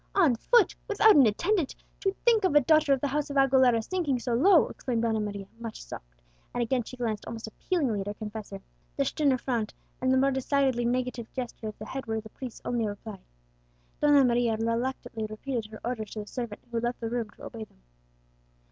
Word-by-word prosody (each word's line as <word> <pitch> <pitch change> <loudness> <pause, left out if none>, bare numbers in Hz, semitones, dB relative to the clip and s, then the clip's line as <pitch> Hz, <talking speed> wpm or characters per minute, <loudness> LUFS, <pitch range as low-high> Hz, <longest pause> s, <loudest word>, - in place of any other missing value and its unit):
"On 325 -11 +5
foot 470 - +4
without 425 -1 +6
an 270 -5 +7
attendant! 340 - 0 0.2
to 390 -1 0
think 455 -3 +5
of 370 -6 +2
a - - +9
daughter 305 +1 +4
of 270 -2 +3
the 285 - 0
house 295 +2 -1
of 280 - -3
Aguilera 260 -4 +4
sinking 325 -4 0
so 245 0 -2
low!" 330 +8 +5
exclaimed 235 -3 -2
Donna 225 -1 +1
Maria, 205 -2 -4
much 230 - -7
shocked; - - -10 0.4
and 245 - +1
again 250 +2 +1
she 255 +3 -10
glanced 225 -4 -3
almost 225 0 -6
appealingly 235 - -1
at 195 - -6
her 205 - -4
confessor. 210 -2 -7 0.4
The - - +2
sterner 280 -4 +2
frown 235 -4 -1 0.3
and 260 0 +3
more 275 +1 +3
decidedly 265 -2 +1
negative 250 -1 -2
gesture 240 -3 -5
of 215 - -7
the - - -8
head 265 -2 -6
were 220 0 -1
the 220 0 -10
priest's 250 +1 -9
only 235 -3 0
reply. 205 0 -7 0.8
Donna 290 -2 +6
Maria 240 -2 +2
reluctantly 230 0 -2
repeated 225 +1 -4
her 215 0 -10
orders 225 -4 -3
to 215 - -4
the 205 - -10
servant, 235 -3 -5
who 230 - 0
left 240 +1 -2
the 230 - -3
room 235 -3 -2
to - - -15
obey 225 -3 -7
them. 65 - -30
245 Hz, 205 wpm, -28 LUFS, 220-275 Hz, 0.8 s, a